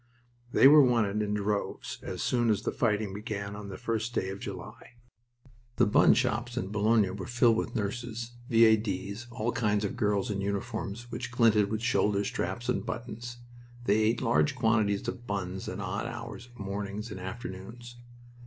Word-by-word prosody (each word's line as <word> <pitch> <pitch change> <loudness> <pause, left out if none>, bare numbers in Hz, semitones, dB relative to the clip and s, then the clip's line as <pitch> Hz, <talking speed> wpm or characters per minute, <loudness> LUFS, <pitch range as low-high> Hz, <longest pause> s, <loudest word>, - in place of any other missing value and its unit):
They 135 - +7
were 150 +1 +9
wanted 110 -5 +2
in 105 0 -1
droves 105 0 -2
as - - -4
soon 120 -2 +2
as 105 - +1
the - - 0
fighting 105 -4 0
began 100 -1 -5
on 105 -1 -7
the 95 - -6
first 115 +1 -2
day 95 - 0
of 95 +1 -6
July. 105 +6 -8 0.8
The - - +4
bun 105 - +5
shops 120 +2 -1
in 95 -6 -2
Boulogne 105 -2 +2
were 95 - -6
filled 120 -1 +4
with 120 +2 -2
nurses, 120 +2 -3 0.2
V.A.D.'s, 110 -2 +2
all 120 -1 -2
kinds 105 -4 +1
of - - -3
girls 105 -3 0
in 100 -1 -2
uniforms 105 +3 -4
which 120 0 -4
glinted 115 -4 +4
with 110 +1 -2
shoulder 105 -5 +2
straps - - -3
and - - 0
buttons. 120 +2 -6 0.5
They 100 0 +4
ate 110 +2 +2
large 130 +4 +2
quantities 110 -4 +1
of 120 -1 -5
buns 95 -2 -3
at - - -5
odd - - -3
hours 115 -1 -7
of 120 0 -19
mornings 100 +2 -4
and 95 - -6
afternoons. 115 +4 -8
110 Hz, 170 wpm, -29 LUFS, 100-120 Hz, 0.8 s, were